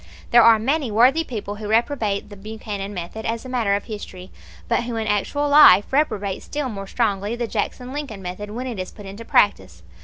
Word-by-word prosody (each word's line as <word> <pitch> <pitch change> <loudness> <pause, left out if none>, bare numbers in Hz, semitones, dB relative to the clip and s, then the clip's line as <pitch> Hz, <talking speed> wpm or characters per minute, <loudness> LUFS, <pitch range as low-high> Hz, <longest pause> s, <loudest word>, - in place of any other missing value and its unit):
There 240 - +7
are 230 -1 +7
many 270 +4 -1
worthy 250 +9 +4
people 210 -7 -6
who 215 -1 -6
reprobate 220 -3 0
the 205 - -10
Buchanan 205 -1 -6
method 185 +3 -6
as 230 +2 -3
a - - -7
matter 230 -6 +1
of 200 - -3
history, 190 -4 -9 0.4
but - - 0
who 240 -1 -4
in 225 -1 -2
actual 215 +8 0
life 285 -8 +7
reprobate 205 -10 0
still 290 -3 -4
more 195 -3 -7
strongly 205 -1 -1
the 240 0 -2
Jackson 245 +4 -4
Lincoln 270 -10 -6
method 185 +3 -6
when 240 +5 -5
it 240 -6 -5
is 185 - -4
put 205 - -13
into 200 +4 -9
practice. 95 - +1
220 Hz, 205 wpm, -22 LUFS, 200-245 Hz, 0.4 s, There